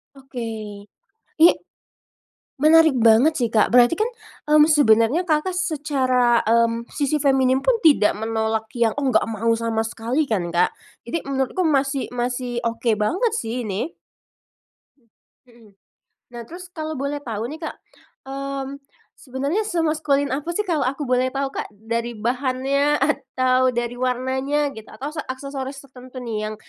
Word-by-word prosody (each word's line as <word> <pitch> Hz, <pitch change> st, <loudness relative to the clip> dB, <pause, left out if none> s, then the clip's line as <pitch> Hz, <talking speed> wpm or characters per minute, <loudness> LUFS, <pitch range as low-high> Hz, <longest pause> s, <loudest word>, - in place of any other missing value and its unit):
Oke. 225 Hz, -6 st, -7 dB, 0.5 s
I 335 Hz, -, +10 dB, 1.2 s
menarik 320 Hz, -1 st, +6 dB
banget 230 Hz, +7 st, +5 dB
sih, 240 Hz, -3 st, 0 dB
Kak. 215 Hz, -, +4 dB
Berarti 245 Hz, +4 st, +6 dB
kan, 435 Hz, -, +1 dB, 0.4 s
mmm, 300 Hz, 0 st, +7 dB
sebenernya 260 Hz, +1 st, +4 dB
Kakak 320 Hz, +3 st, 0 dB
secara, 270 Hz, -8 st, +1 dB
mmm, 230 Hz, +1 st, +1 dB
sisi 290 Hz, +1 st, 0 dB
feminim 265 Hz, -1 st, +3 dB
pun -, -, +3 dB
tidak 290 Hz, -10 st, +5 dB
menolak 220 Hz, 0 st, -1 dB
yang 230 Hz, -2 st, +2 dB
enggak 265 Hz, -4 st, +2 dB
mau 225 Hz, +1 st, -1 dB
sama 225 Hz, -1 st, -1 dB
sekali 235 Hz, +7 st, -1 dB
kan, 180 Hz, -6 st, -1 dB
Kak? 175 Hz, +1 st, +3 dB, 0.4 s
Jadi 335 Hz, -, -1 dB
menurutku 270 Hz, +6 st, -1 dB
masih 275 Hz, -2 st, 0 dB
masih 245 Hz, 0 st, -2 dB
oke 230 Hz, 0 st, 0 dB
banget 375 Hz, -, +1 dB
sih 235 Hz, +1 st, -3 dB
ini. 205 Hz, -, -3 dB, 1.1 s
Mmm, 240 Hz, -5 st, -35 dB, 0.4 s
mhm. 230 Hz, -3 st, -19 dB, 0.6 s
Nah, 235 Hz, 0 st, -7 dB
terus 350 Hz, +9 st, -10 dB
kalau 315 Hz, -3 st, -4 dB
boleh 285 Hz, +1 st, -3 dB
tahu 225 Hz, -2 st, -4 dB
nih 310 Hz, +5 st, -8 dB
Kak, 315 Hz, -, -5 dB, 0.5 s
mmm, 275 Hz, 0 st, -5 dB, 0.3 s
sebenernya 280 Hz, -, -2 dB
semaskulin 310 Hz, -7 st, 0 dB
apa 295 Hz, +5 st, -4 dB
sih 420 Hz, -1 st, -1 dB
kalau 315 Hz, -5 st, 0 dB
aku 275 Hz, +2 st, -2 dB
boleh 255 Hz, +1 st, +1 dB
tahu, 275 Hz, 0 st, -2 dB
Kak? -, -, -4 dB
Dari 230 Hz, +2 st, -4 dB
bahannya, 265 Hz, +4 st, 0 dB
atau, 255 Hz, -2 st, +1 dB
dari 240 Hz, 0 st, -3 dB
warnanya, 260 Hz, +3 st, -1 dB
gitu? 220 Hz, -1 st, -11 dB
Atau 290 Hz, +4 st, -7 dB
se 310 Hz, -, -3 dB
aksesoris 270 Hz, +1 st, -6 dB
tertentu 255 Hz, -1 st, -12 dB
nih 215 Hz, -3 st, -4 dB
yang, -, -, -6 dB
260 Hz, 145 wpm, -22 LUFS, 230-290 Hz, 1.2 s, I